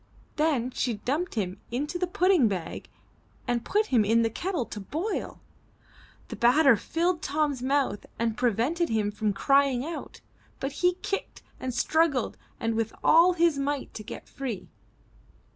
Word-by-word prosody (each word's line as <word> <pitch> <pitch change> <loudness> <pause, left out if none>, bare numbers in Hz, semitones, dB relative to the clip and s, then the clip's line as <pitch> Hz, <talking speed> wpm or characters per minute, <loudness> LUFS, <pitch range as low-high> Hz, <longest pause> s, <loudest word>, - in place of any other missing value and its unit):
Then 285 -6 +1
she 245 -2 -1
dumped 285 - -2
him 190 -4 -3
into 295 +8 -3
the 360 - 0
pudding 360 -6 +3
bag 185 -5 -4 0.6
and 240 -1 0
put 425 +1 +1
him 230 -4 +5
in 225 +3 +3
the 225 - 0
kettle 340 - -2
to 210 - -7
boil. 320 - -4 0.9
The - - -5
batter 265 +2 +5
filled 335 - -1
Tom's 290 -3 0
mouth 265 -5 0
and 230 -1 0
prevented 250 - +1
him 215 -2 0
from 210 0 -1
crying 275 +4 +2
out, 330 +1 -7 0.4
but 270 - -2
he 360 0 +4
kicked 395 - -4 0.2
and 260 - -3
struggled 285 +1 +1 0.2
with 225 -1 -1
all 340 +3 +6
his 335 -4 +2
might 280 0 -2
to - - -7
get - - -8
himself - - -25
free. 245 -9 -4
270 Hz, 155 wpm, -27 LUFS, 230-325 Hz, 0.9 s, all